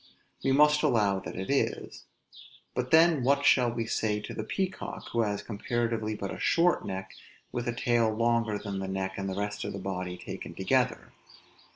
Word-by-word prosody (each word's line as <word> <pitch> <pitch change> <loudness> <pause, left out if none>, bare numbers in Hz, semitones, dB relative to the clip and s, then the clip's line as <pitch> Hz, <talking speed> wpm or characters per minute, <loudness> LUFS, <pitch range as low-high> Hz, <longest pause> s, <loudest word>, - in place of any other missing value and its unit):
We 135 - +2
must 150 +2 +5
allow 105 -9 +2
that 95 - -8
it 95 +7 -3
is. 140 - -1 0.7
But 125 0 -2
then 160 -1 +5
what 140 +2 +3
shall 125 -4 +5
we 115 -1 -2
say 105 -1 0
to 105 - -7
the 110 - -4
peacock, 190 - -4
who 115 - +1
has 105 -2 -1
comparatively 115 0 -2
but 100 -2 -4
a - - -8
short 175 +1 +3
neck, 95 -1 -5 0.4
with 120 0 -3
a 120 - 0
tail 120 -3 +2
longer 115 -1 +1
than 100 -1 -5
the 95 - -3
neck 95 0 -2
and 95 0 -3
the 95 - -3
rest 105 0 -3
of - - -4
the - - -5
body 90 -2 -4
taken - - -8
together? - - 0
115 Hz, 190 wpm, -29 LUFS, 100-125 Hz, 0.7 s, must